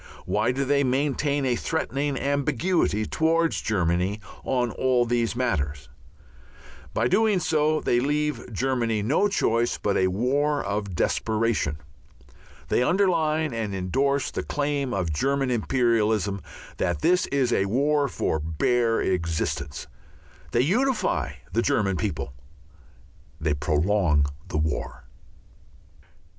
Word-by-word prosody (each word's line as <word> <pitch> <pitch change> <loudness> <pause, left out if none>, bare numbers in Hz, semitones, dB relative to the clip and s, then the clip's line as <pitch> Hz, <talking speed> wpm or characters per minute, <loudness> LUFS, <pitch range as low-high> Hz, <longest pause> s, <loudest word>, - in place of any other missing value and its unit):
Why 105 +3 +1
do 135 +2 -1
they 140 +1 +2
maintain 140 +2 0
a 125 -2 +2
threatening 145 0 -2
ambiguity 140 - 0
towards 165 +3 +1
Germany 90 0 0 0.2
on 125 -3 0
all 125 -1 +2
these 120 -1 0
matters? 75 - -2 1.0
By 115 +7 +1
doing 215 - +3
so 155 -2 +1
they 120 - +2
leave 145 -2 -1
Germany 115 -2 0
no 145 - +2
choice 120 - +1
but 100 - 0
a 95 - +3
war 140 +9 0
of 100 -2 -3
desperation. 110 -5 0 0.9
They - - +2
underline 160 -3 +2
and 110 -4 -3
endorse 135 +9 0
the - - -3
claim 145 -2 -2
of 90 -5 -1
German 135 - 0
imperialism 110 -5 +1 0.4
that 85 - -1
this 180 +3 +3
is 130 -3 +1
a 95 - +2
war 140 +6 +2
for 80 - -1
bare 115 +10 +1
existence. 85 -5 -2 0.7
They 120 - +3
unify 240 - +1 0.2
the - - +2
German 95 -3 +1
people. 70 -4 -3 1.1
They 80 -1 0
prolong 75 +1 +2 0.2
the - - -3
war. 75 -1 -2
120 Hz, 120 wpm, -25 LUFS, 100-145 Hz, 1.1 s, doing